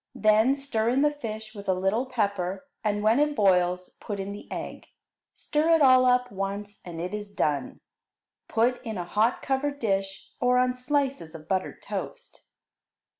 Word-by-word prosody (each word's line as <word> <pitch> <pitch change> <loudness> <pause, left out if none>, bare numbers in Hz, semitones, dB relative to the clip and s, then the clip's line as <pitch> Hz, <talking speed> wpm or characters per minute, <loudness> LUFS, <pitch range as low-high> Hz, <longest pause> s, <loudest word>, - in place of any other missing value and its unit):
Then 220 +5 +4
stir 235 -5 -1
in 265 +4 +2
the 295 - +4
fish 220 -5 -7
with 200 -3 -7
a 185 - +3
little 195 +7 0
pepper, 200 -2 -2 0.2
and 210 -1 0
when 220 +5 +4
it 295 0 +2
boils 180 -3 +2
put 205 -2 -5
in 195 +1 -4
the 205 - -10
egg. - - -6 0.5
Stir 305 +2 0
it 325 - +2
all 255 -1 +6
up 250 0 +3
once, 200 +1 -5
and 170 -2 -7
it 180 +4 -4
is 210 -1 -5
done. 145 -9 -2 0.7
Put 240 +2 +1
in 220 -3 -4
a 175 - -3
hot 215 +7 +1
covered 280 +1 -1
dish, 195 -5 -2
or 250 0 +3
on 250 0 +3
slices 255 - -2
of 155 -1 -11
buttered 190 0 -2
toast. - - -7
215 Hz, 175 wpm, -27 LUFS, 195-255 Hz, 0.7 s, all